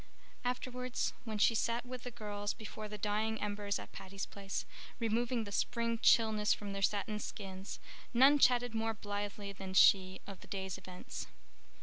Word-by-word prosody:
Afterwards, 250 0 -2
when 220 -2 -3
she 210 - +5
sat 230 +2 0
with 250 0 -6
the 250 - -5
girls 205 -3 -3
before 215 0 -7
the 210 0 -6
dying 215 +2 0
embers 205 -1 -1
at - - -9
Patty's 195 +1 -5
Place, 195 -1 -4 0.3
removing 230 +1 +1
the 200 - -7
spring 230 +2 0
chilliness 220 -3 +5
from 205 -1 -6
their 195 - -3
satin 210 +1 +1
skins, 195 -2 -6 0.3
none 270 +4 +7
chatted 245 -2 +4
more 225 0 0
blithely 205 0 -4
than 190 -1 -6
she 190 -1 +6
of 195 -2 -8
the - - -14
day's 190 -1 -3
events. 180 -1 -7
210 Hz, 160 wpm, -35 LUFS, 200-230 Hz, 0.3 s, none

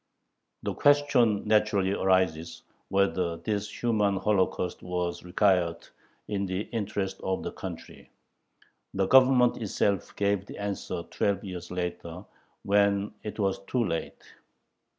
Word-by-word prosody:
The - - -2
question 140 -8 +3
naturally 105 -3 +2
arises, 90 -4 0 0.3
whether 95 -3 +1
this 105 +1 -3
human 105 -4 +2
holocaust 95 -2 0
was 90 -1 -3
required 90 -2 +1 0.4
in 100 -1 -2
the 95 +1 -2
interest 100 -4 -3
of 95 0 -2
the - - -4
country. - - -9 0.9
The 95 0 +2
Government 130 +1 +5
itself 100 -2 -1
gave 100 -1 0
the - - -9
answer 100 -3 -4
twelve 100 0 0
years 90 -3 -7
later 90 0 -5 0.4
when 100 0 +2
it 105 - -6
was 100 -3 0
too 120 +1 0
late. 85 -3 -4
100 Hz, 120 wpm, -28 LUFS, 90-105 Hz, 0.9 s, Government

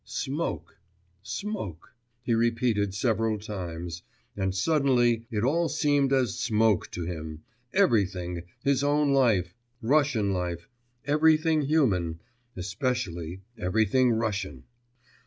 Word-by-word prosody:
'Smoke, 145 +4 -4 0.4
smoke,' 115 - -5 0.3
he 120 - 0
repeated 115 -3 +1
several 110 0 +1
times; 90 -5 -6 0.3
and 95 -2 -1
suddenly 120 -3 +2
it 105 -1 -2
all 165 +6 +2
seemed 145 -3 +2
as 130 -6 +1
smoke 110 -2 +2
to 85 - -5
him, 80 -2 -6 0.3
everything, 95 - +1 0.2
his 140 -1 +2
own 145 0 +2
life, 105 -10 +3 0.3
Russian 120 -6 +2
life 90 -2 -3 0.4
everything 155 +2 +3
human, 105 - +1 0.4
especially 90 -3 -3 0.2
everything 110 +7 +2
Russian. 105 - -2
110 Hz, 100 wpm, -27 LUFS, 90-135 Hz, 0.4 s, life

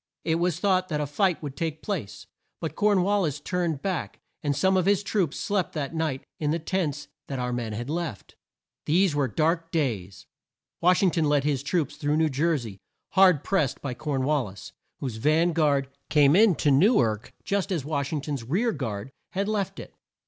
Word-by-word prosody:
It 165 0 +1
was 175 -1 0
thought 185 -2 +2
that 150 -2 -1
a 150 - 0
fight 175 +4 0
would 140 -2 -5
take 160 +1 -3
place, 160 - -4 0.3
but - - -4
Corn 205 -3 +3
wal 205 +2 +2
lis 150 -5 -1
turned 170 -3 -2
back 190 -4 -3 0.2
and 145 -2 0
some 190 +7 +3
of 185 0 +2
his 200 0 +3
troops 190 -7 -1
slept 200 -5 -1
that 150 -1 -3
night 160 -5 -2 0.2
in 150 - 0
the 160 - +1
tents 155 -4 -2 0.2
that 135 - -4
our 125 -1 -2
men 115 -3 -3
had 120 +3 -4
left. 160 - -4 0.5
These 175 +2 +3
were 145 -2 +1
dark 165 - 0
days. 100 - -2 0.6
Wash 180 +3 +4
ing 185 - +4
ton 160 -2 +1
led 145 -1 +2
his 140 -3 0
troops 150 0 -1
through 150 0 0
New 160 -1 +3
Jer 155 +4 +1
sey, 110 -7 -8 0.3
hard 185 -6 +5
pressed 185 -10 0
by 135 -3 -4
Corn 140 0 -2
wal 145 -2 +1
lis, 95 -1 -10 0.3
whose 125 -5 -3
van 160 +7 +2
guard 145 -4 +2 0.2
came 145 0 +5
in 210 -2 +6
to 145 - +2
New 195 - +5
ark 110 -1 0
just 200 0 -1
as 160 -7 -1
Wash 145 -2 -2
ing 155 -3 -1
ton's 140 -4 -4
rear 190 - +1
guard 115 - -4 0.2
had 195 +2 -1
left 210 -2 -2
it. - - -10
155 Hz, 205 wpm, -26 LUFS, 140-180 Hz, 0.6 s, in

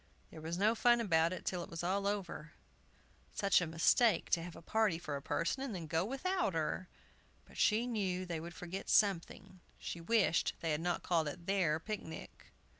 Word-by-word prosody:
There 160 - -10
was 165 +2 -3
no 210 +4 +3
fun 240 +1 +4
about 165 -6 +3
it 185 - -6
till 180 -2 -2
it - - -10
was 165 0 -5
all 195 +3 0
over. 185 -6 -4 0.8
Such 200 -2 +3
a 175 - -1
mistake 165 +5 +3
to 170 - +3
have 170 0 -8
a - - -11
party 215 -3 +1
for 155 -4 -5
a 140 - -4
person, 170 - -1
and 265 -7 -3
then 170 -3 -5
go 160 +1 0
without 270 - -1
her; 165 +3 -2 0.6
but - - -18
she 220 +2 +3
knew 190 -6 -1
they 170 -3 -3
would 170 +1 -8
forget 180 +2 -6
something! 190 -1 +1 0.2
She 170 - -6
wished 195 -2 +2
they 165 - -1
had 150 +1 0
not 175 0 -1
called 165 -3 +1
it 170 +4 -6
their 180 -6 +1
picnic. 165 -4 -7
180 Hz, 195 wpm, -35 LUFS, 165-205 Hz, 0.8 s, fun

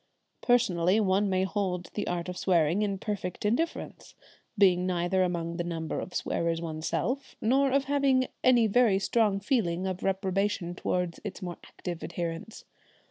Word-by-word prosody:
Personally 190 -5 +3
one 200 0 +2
may 185 0 +1
hold 190 -2 -2
the 205 - -3
art 175 0 -2
of 180 - -4
swearing 175 0 +2
in 200 -2 0
perfect 195 -2 -4
indifference, 250 +11 -2 0.4
being 185 -2 +4
neither 180 +1 +1
among 170 -2 -1
the 175 - -1
number 165 -2 -3
of 180 - -7
swearers 165 0 -1
oneself 165 - -3
nor 270 +5 +3
having 275 -2 +2 0.2
any 245 -3 +5
very 220 -2 +4
strong 205 0 +1
feeling 190 -5 0
of 185 -1 -3
reprobation 195 -2 -1
towards 180 -1 -2
its 205 -1 -6
more 175 -1 -5
active 175 -2 -7
adherents. 170 +5 -5
190 Hz, 145 wpm, -28 LUFS, 175-210 Hz, 0.4 s, any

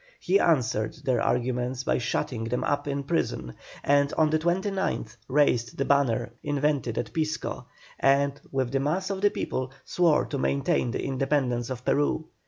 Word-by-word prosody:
He 195 +2 +3
answered 115 - +1
their 125 -3 +1
arguments 125 +1 0
by - - +1
shutting 115 -1 -2
them 125 +2 -1
up 145 0 -1
in 140 0 -2
prison, 65 - -2 0.3
and 140 0 +3
on 155 -1 +3
the 155 - +2
29th 185 - -1
raised 125 -4 +2
the 140 - 0
banner 135 -6 +2
invented 145 -4 0
at 120 -2 -3
Pisco, 155 -1 -2 0.3
and, 140 +1 +2
with 130 -3 -1
the 135 - +1
mass 180 +8 -1
of 190 -1 -3
the 205 - +5
people, 130 -8 -3
swore 170 -4 +3
to 140 - -4
maintain 140 -2 +1
the 120 - -3
independence 135 -3 0
of 125 -1 -6
Peru. 145 +2 +1
140 Hz, 165 wpm, -27 LUFS, 125-150 Hz, 0.3 s, the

